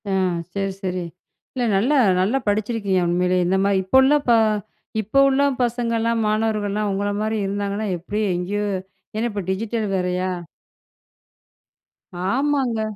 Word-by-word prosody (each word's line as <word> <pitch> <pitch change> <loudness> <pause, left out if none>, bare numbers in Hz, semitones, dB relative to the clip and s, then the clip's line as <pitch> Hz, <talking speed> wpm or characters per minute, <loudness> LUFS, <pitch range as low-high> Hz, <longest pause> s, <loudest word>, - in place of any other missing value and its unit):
ஆ - - -1 0.4
சரி, 195 -1 -1
சரி. 180 -1 -2 0.5
இல்ல 255 - -2
நல்லா 240 +10 +2 0.3
நல்லா 215 +8 +2
படிச்சிருக்கீங்க 205 -2 0
உண்மையிலேயே. 180 +1 +2
இந்த 190 +2 +2
மாதிரி 200 -1 +2
இப்போ 190 +8 +3
உள்ள 280 +3 +5
பா 235 - +6 0.6
இப்போ 220 +6 +1
உள்ள 270 +1 +2 0.2
பசங்கலாம், 230 -1 0
மாணவர்கள்லாம் 210 -1 0
உங்கள 200 +1 -1
மாரி 215 +1 -1
இருந்தாங்கன்னா, 200 +2 -2
எப்படி 205 +5 -3
எங்கேயோ 195 +4 -2 0.5
ஏன்னா, 225 +2 0
இப்ப 205 -1 -3
டிஜிட்டல் 220 +3 -1
வேறையா 180 0 -1 2.0
ஆமாங்க. 265 -2 +1
210 Hz, 125 wpm, -22 LUFS, 195-230 Hz, 2.0 s, பா